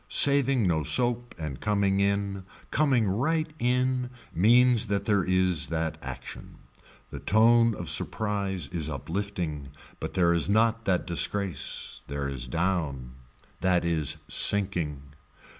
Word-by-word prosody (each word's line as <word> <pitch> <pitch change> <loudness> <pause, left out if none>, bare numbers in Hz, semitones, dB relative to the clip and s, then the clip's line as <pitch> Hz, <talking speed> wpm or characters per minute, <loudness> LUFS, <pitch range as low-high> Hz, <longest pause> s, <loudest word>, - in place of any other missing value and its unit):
Saving 135 -4 +4
no 85 -3 +1
soap 120 +5 -1
and 75 -5 -6
coming 100 -2 +1
in, 100 -1 -1 0.3
coming 130 -8 +2
right 155 +10 -1
in 125 +1 0 0.2
means 120 +4 +4
that 100 -1 -2
there 100 -3 +2
is 90 -6 +1
that 80 0 -3
action. 65 -2 -9 0.6
The - - -7
tone 115 +1 +3
of 85 - -7
surprise 95 +1 -1
is 80 -2 -3
uplifting 80 -2 -4 0.3
but - - -6
there 85 -2 +3
is 85 +3 0
not 115 +2 +2
that 95 -2 0
disgrace, 95 +2 -2
there 70 0 -4
is 65 -3 -5
down, 75 -5 -2 0.5
that 90 -2 +1
is 80 -4 +1
sinking. 90 -8 +3
95 Hz, 125 wpm, -27 LUFS, 80-115 Hz, 0.6 s, Saving